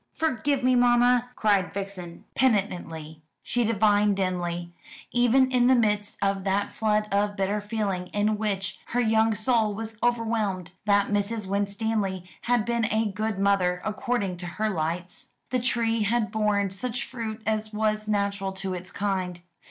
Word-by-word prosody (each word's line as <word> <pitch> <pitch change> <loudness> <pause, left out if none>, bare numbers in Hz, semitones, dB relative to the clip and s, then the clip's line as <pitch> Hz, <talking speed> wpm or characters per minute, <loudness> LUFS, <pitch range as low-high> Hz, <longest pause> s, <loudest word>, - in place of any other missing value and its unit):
"Forgive 285 -3 0
me, 255 0 +4
mamma!" 245 0 +4
cried 200 -4 +2
Vixen 190 -4 -6
penitently. 175 -9 -1 0.2
She 245 - 0
divined 210 -2 +3
dimly 175 -2 -2 0.4
even 245 +2 +4
in 245 -1 +4
the 260 - +6
midst 210 -3 +1
of 195 -1 0
that 200 +1 0
flood 210 -1 +1
of 205 +1 +1
bitter 200 +1 0
feeling 205 -4 -2
in 210 +2 0
which 195 -3 -2 0.2
her - - +3
young 220 -1 +3
soul 215 -1 +1
was 225 0 -6
overwhelmed 220 -7 0
that 200 -1 +3
Mrs. 205 +1 -1
Winstanley 200 -1 -1 0.3
had 240 -3 +3
been 235 -1 +1
a 220 -1 0
good 215 +1 -2
mother, 195 -2 +2
according 210 -3 -1
to 175 0 -6
her 215 +5 -1
lights. 170 +1 -3 0.2
The 255 - +2
tree 230 -2 0
had 215 0 +1
borne 210 -3 +1
such 250 +6 -2
fruit 225 -3 -6
as 215 0 -1
was 215 0 0
natural 200 -2 -1
to 190 0 -3
its 180 0 -6
kind. 185 -3 -2
210 Hz, 150 wpm, -26 LUFS, 195-225 Hz, 0.4 s, the